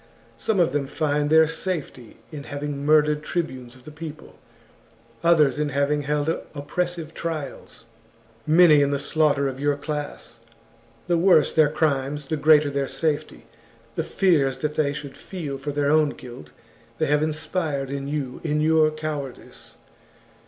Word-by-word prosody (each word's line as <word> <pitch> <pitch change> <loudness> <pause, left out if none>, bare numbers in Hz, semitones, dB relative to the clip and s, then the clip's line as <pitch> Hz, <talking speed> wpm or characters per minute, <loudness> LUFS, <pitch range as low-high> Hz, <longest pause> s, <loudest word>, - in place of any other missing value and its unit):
Some 215 -4 0
of 170 -6 +3
them 140 -1 -1
find 145 0 0
their 160 0 +6
safety 160 - -5
in 145 -2 -8
having 145 0 -5
murdered 150 0 +3
tribunes 130 -7 -4
of 130 -1 -19
the 155 - -9
peo 155 0 -7
ple, 155 - -18 0.8
others 150 -5 +4
in 150 -1 0
having 140 +1 0
held 145 +1 -1 0.3
oppressive 165 +3 -3
trials, 155 -8 -6 0.6
many 155 -2 +6
in 140 - +2
the 140 - 0
slaughter 145 -1 +1
of 135 -1 -5
your 145 0 +1
class. 145 -5 -6 0.7
The 175 -1 +1
worse 175 -4 +4
their 155 -2 +4
crimes 145 -2 -1
the 155 - 0
greater 150 -1 +4
their 140 -1 -1
safety; 155 0 -2 0.5
the - - -2
fears 150 -9 +2
that 150 -1 -2
they 150 -2 +1
should 140 -1 -7
feel 150 -8 -6
for 145 +2 -4
their 145 0 +1
own 155 -1 +4
guilt 120 - -10 0.5
they - - +1
have 150 +1 +2
inspired 155 -3 -2
in 140 0 -4
you 140 -3 -4
in 150 -2 0
your 155 0 +4
cowardice. 155 -4 -7
150 Hz, 155 wpm, -24 LUFS, 140-155 Hz, 0.8 s, their